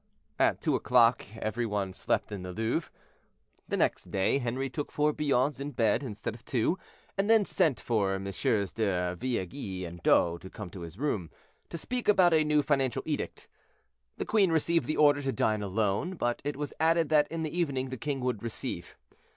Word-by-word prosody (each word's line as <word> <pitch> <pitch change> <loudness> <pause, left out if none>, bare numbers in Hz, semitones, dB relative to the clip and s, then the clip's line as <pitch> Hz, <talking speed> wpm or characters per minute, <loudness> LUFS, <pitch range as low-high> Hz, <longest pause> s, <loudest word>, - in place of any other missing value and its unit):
At - - +3
two - - +1
o'clock 120 -1 +4
every 115 +2 -2
one 100 -3 -2
slept - - -1
in 100 -3 -5
the 90 0 -6
Louvre. 115 - -1 0.8
The - - -1
next - - 0
day, 95 +8 +1
Henri 130 +2 -2
took 145 +2 -5
four 150 0 +2
bouillons 140 -2 +1
in 140 +1 -5
bed 115 +1 +2
instead 110 -5 -5
of 115 +1 -13
two, 130 +9 0 0.4
and 200 +2 +1
then 225 -2 +5
sent 150 -8 +1
for 100 -5 0
MM. 100 +1 -1
de 90 -5 0
Villeguie 95 -3 -3
and 85 0 -9
D'O 85 +1 +3
to 95 - -10
come 100 -3 -8
to 95 - -9
his 85 +2 -8
room, 110 - -1 0.4
to - - -5
speak 250 +8 -4
about 185 -4 +5
a 155 -1 +5
new 150 -1 +2
financial 135 -4 +1
edict. 150 -2 -4 0.7
The - - -3
queen 200 -5 +3
received 165 +1 +2
the 155 - -1
order 145 -1 +5
to 135 -1 -1
dine 110 -4 +1
alone, 105 - -1
but 120 -7 -1
it 145 0 -3
was 145 -1 -4
added 165 -1 +3
that 150 -1 +4
in 165 0 -4
the 155 +1 -4
evening 140 -7 -1
the 130 - -4
king 140 +2 -3
would 125 -5 -1
receive. 115 -2 -5
130 Hz, 190 wpm, -29 LUFS, 105-150 Hz, 0.8 s, then